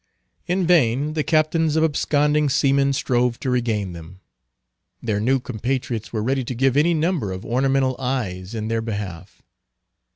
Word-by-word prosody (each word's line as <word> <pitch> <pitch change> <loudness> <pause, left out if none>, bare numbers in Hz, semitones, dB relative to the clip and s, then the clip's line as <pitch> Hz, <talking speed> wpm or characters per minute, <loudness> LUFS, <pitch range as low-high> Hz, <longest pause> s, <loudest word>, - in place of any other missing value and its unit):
In 180 +1 +1
vain 150 -3 +2
the 155 -1 0
captains 155 0 +2
of 160 - +3
absconding 150 -1 +2
seamen 140 +1 +2
strove 125 -3 0
to 130 - -1
regain 110 -7 -1
them. 85 +2 -11 0.8
Their 105 -3 -1
new 130 +5 +2
compatriots 120 -1 -3
were 110 -2 -2
ready 130 +2 0
to 125 +1 -5
give 135 +2 +2
any 165 +4 +3
number 160 - 0
of 95 0 -6
ornamental 135 +1 +1
eyes 115 -7 -3
in 110 -1 -3
their 115 0 -1
behalf. 100 -5 -6
130 Hz, 155 wpm, -22 LUFS, 110-145 Hz, 0.8 s, of